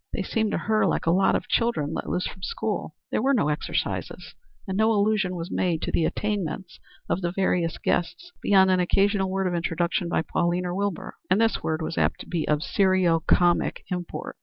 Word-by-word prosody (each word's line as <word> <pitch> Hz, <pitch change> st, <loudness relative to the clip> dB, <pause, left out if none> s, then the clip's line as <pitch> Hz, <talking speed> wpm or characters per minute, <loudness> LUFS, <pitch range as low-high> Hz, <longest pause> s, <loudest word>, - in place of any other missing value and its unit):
They -, -, -1 dB
seemed 220 Hz, -2 st, 0 dB
to -, -, +1 dB
her 215 Hz, 0 st, +1 dB
like -, -, -1 dB
a 165 Hz, -, +3 dB
lot 190 Hz, +3 st, +3 dB
of -, -, -2 dB
children 160 Hz, -11 st, 0 dB
let -, -, -4 dB
loose 180 Hz, -, -1 dB
from 185 Hz, -, -7 dB
school. 460 Hz, -, -3 dB, 0.2 s
There -, -, +1 dB
were 270 Hz, +3 st, +3 dB
no 150 Hz, -11 st, +2 dB
exercises, 150 Hz, -, -3 dB, 0.3 s
and 190 Hz, -, -2 dB
no 220 Hz, +2 st, +3 dB
allusion 205 Hz, -3 st, +1 dB
was 170 Hz, +1 st, -5 dB
made 170 Hz, -3 st, 0 dB
to -, -, -2 dB
the 165 Hz, -, +1 dB
attainments 190 Hz, -3 st, -3 dB, 0.3 s
of 185 Hz, -, -1 dB
the 175 Hz, -1 st, -1 dB
various 175 Hz, -3 st, 0 dB
guests 350 Hz, -, -2 dB
beyond 190 Hz, -2 st, +5 dB
an 185 Hz, -, +3 dB
occasional 195 Hz, +2 st, +2 dB
word 195 Hz, 0 st, -1 dB
of 180 Hz, -, 0 dB
introduction 170 Hz, +1 st, -1 dB
by 165 Hz, -, +1 dB
Pauline 175 Hz, +3 st, 0 dB
or 175 Hz, -, -2 dB
Wilbur; 200 Hz, -2 st, -3 dB
and 185 Hz, +3 st, +3 dB
this 225 Hz, 0 st, +2 dB
word 160 Hz, 0 st, -2 dB
was 160 Hz, -, -3 dB
apt -, -, +1 dB
to -, -, -10 dB
be 170 Hz, -3 st, -2 dB
of 150 Hz, 0 st, +1 dB
serio 185 Hz, -4 st, +3 dB
comic 175 Hz, +2 st, +2 dB
import. 180 Hz, -1 st, -5 dB
185 Hz, 210 wpm, -25 LUFS, 170-200 Hz, 0.3 s, beyond